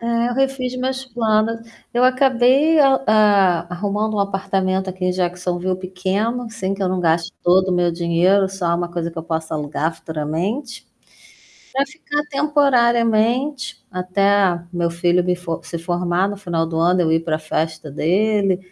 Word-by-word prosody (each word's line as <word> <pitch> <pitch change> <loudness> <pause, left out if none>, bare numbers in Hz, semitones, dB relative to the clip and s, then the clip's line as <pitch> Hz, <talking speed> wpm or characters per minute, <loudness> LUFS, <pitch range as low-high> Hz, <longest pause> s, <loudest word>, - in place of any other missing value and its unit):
É, 235 0 0
eu 245 - -3
refiz 265 -1 -1
minhas 260 +1 -2
planos. 225 -2 0 0.3
Eu 245 +1 +2
acabei, 260 +4 +4
eh, - - +6 0.3
a 200 -5 +4
arrumando 210 +4 -2
um 205 - 0
apartamento 190 -1 -1
aqui 185 0 -6
em - - +2
Jacksonville 180 0 -2
pequeno, 190 +6 -2
assim 225 -4 -4
que 195 - -11
eu 190 - +1
não 185 0 -1
gaste 170 +1 +1
todo 185 +2 +3
o - - +1
meu 175 -1 +2
dinheiro, 175 +3 +2
só 180 -3 -1
uma 175 0 -2
coisa 170 -1 -4
que 165 - -8
eu - - -4
possa 160 -1 -3
alugar 150 +1 -2
futuramente, 170 - -4 0.9
para 270 +1 +1
ficar 295 0 -4
temporariamente, 255 -2 +1
até 190 0 +1
meu 170 -1 -1
filho 175 +1 +1
me 180 0 0
f 180 - -17 0.2
se 170 - -6
formar 175 +2 0
no 205 - -5
final 175 -5 -2
do 165 0 -3
ano 175 +2 +3
eu 160 -1 +1
ir 160 - +3
para 160 -1 -2
festa 155 0 -3
dele, 195 +5 +1
190 Hz, 165 wpm, -20 LUFS, 175-230 Hz, 0.9 s, eh